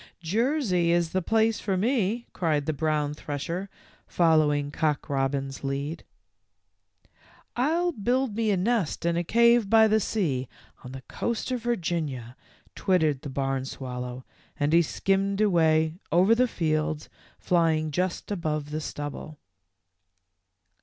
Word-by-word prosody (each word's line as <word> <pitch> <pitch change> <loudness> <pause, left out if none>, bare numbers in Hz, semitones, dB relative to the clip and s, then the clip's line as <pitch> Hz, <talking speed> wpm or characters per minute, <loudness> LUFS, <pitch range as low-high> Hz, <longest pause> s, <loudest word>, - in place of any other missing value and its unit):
"Jersey 210 - +1
is 170 -1 +1
the 185 - 0
place 225 +4 +2
for 195 -3 -1
me," 230 +1 0
cried 155 -5 0
the 155 - -1
brown 150 -1 0
thresher, 165 +6 -5 0.4
following 150 -4 +2
Cock^robin's 135 -3 -1
lead. 140 +4 -3 0.8
" - - -53 0.7
I 255 +5 +1
'11 345 -10 -1
build 245 +1 +1
me 225 -1 0
a 200 - +2
nest 195 -5 0
in 170 0 +2
a 170 - 0
cave 235 +2 +4
by 220 0 +6
the 215 0 +3
sea 150 - -1 0.3
on 125 - -9
the 135 0 -8
coast 235 +2 -3
of 250 -2 -1
Virginia," 160 - -2 0.4
twittered 160 -8 +1
the 145 - -6
barnswal 135 -2 -3
low, 125 +1 -6 0.4
and 145 +2 +1
he 170 - +7
skimmed 195 +4 0
away 160 -4 +2
over 185 +6 +5
the 250 +2 +3
fields, 155 -5 -1 0.3
fly 170 -2 +2
ing 155 0 -2
just 180 +6 -2
above 155 -6 -2
the 155 +1 -3
stubble. 145 +1 -6
170 Hz, 140 wpm, -26 LUFS, 145-210 Hz, 0.8 s, he